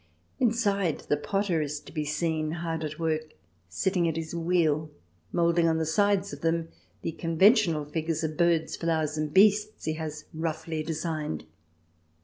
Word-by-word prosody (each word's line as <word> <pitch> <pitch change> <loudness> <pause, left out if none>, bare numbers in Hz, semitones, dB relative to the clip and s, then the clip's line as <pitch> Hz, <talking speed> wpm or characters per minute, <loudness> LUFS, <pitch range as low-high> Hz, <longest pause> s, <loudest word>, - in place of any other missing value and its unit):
Inside, 205 - +1
the - - +4
potter 190 +1 0
is 150 0 -3
to - - -13
be 155 -2 -2
seen 155 +1 -1
hard 165 -1 -3
at 155 0 -4
work, 155 -2 -2 0.3
sitting 175 - +1
at 160 - -1
his 160 0 -4
wheel, 165 -3 +1 0.4
moulding 170 0 +3
on 160 0 +2
the 160 - 0
sides 200 +4 +2
of - - -8
them 165 0 0 0.3
the 165 - -1
conven 165 +5 +5
tional 170 - 0
figures 160 +1 -2
of 155 -1 -2
birds, 170 -1 +2
flowers, 160 -2 0
and 155 -1 -2
beasts 210 +3 +4
he 155 - 0
has 155 -1 -5
roughly 160 0 -3
designed. 155 - -3
165 Hz, 160 wpm, -28 LUFS, 155-175 Hz, 0.4 s, conven